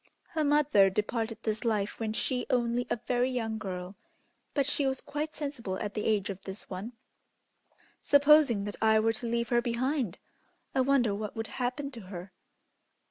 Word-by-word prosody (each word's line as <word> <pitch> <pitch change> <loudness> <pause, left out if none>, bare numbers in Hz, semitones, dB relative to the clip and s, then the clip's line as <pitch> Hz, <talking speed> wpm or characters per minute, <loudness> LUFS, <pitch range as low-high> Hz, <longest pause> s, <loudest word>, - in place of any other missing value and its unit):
Her 315 -2 -1
mother 290 -9 +5
departed 220 +3 -1
this 215 +1 -1
life 210 -4 0
when 220 -1 -1
she 250 +2 -1
only 245 0 +1
a - - +2
very 250 0 +2
young 225 -3 -2
girl, 185 -2 -5 0.6
but 280 -2 +3
she 285 0 +1
was 265 0 0
quite 300 +2 -4
sensible 245 -10 -4
at 205 0 -4
the 210 - -3
age 205 -2 +1
of 195 - -8
this 190 +1 -8
one. 200 +6 -6 1.1
Supposing 285 -6 +5
that 205 0 -5
I 220 0 +5
were 225 +1 +2
to 235 +2 -4
leave 235 0 0
her 240 -1 +3
behind, 245 - -1 0.6
I 265 - +3
wonder 255 -5 +3
what 210 0 -4
would 225 0 -3 0.2
happen 265 +3 -1
to 235 -4 -9
her!" 185 0 -7
235 Hz, 175 wpm, -30 LUFS, 210-265 Hz, 1.1 s, mother